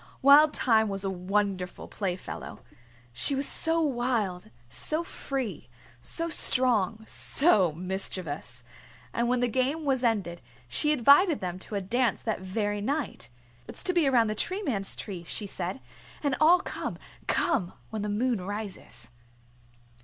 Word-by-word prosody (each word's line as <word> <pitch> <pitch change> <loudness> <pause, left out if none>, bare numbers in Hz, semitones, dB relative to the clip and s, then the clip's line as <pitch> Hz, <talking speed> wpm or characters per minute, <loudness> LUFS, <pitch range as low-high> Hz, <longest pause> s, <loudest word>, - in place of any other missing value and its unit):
Wild 295 +2 +7
Thyme 220 -3 +3
was 195 0 -2
a 195 - -1
wonderful 190 0 -2
playfellow. 185 -3 -5 0.5
She 275 - +1
was 275 +1 0
so 325 +1 +4
wild, 240 - -1 0.2
so 310 - +1
free, 260 - -5 0.3
so 330 - +2
strong, 230 - +2
so 215 - +3
mischievous. 175 -8 -3 0.5
And 235 0 0
when 250 0 +1
the 245 - +2
game 265 +6 -1
was 265 -2 +1
ended 200 -7 0 0.3
she 300 - +1
invited 295 - +5
them 180 -1 -5
to 205 - -8
a 200 - -1
dance 240 +6 0
that 220 -3 -2
very 205 +2 -2
night. 280 +3 -3 0.4
"It's - - -8
to 365 - 0
be 340 -5 +3
around 245 -4 +4
the 215 - -1
Tree 370 - -2
Man's 200 - -1
Tree," 185 -4 -7
she 205 +4 -3
said. 185 -4 -4 0.4
"And 285 -2 +1
all 350 +4 +6
come - - -5 0.3
come 200 - 0 0.2
when 220 -1 -3
the 210 - -3
moon 230 0 0
rises." 195 - -7
220 Hz, 145 wpm, -28 LUFS, 190-275 Hz, 0.5 s, Wild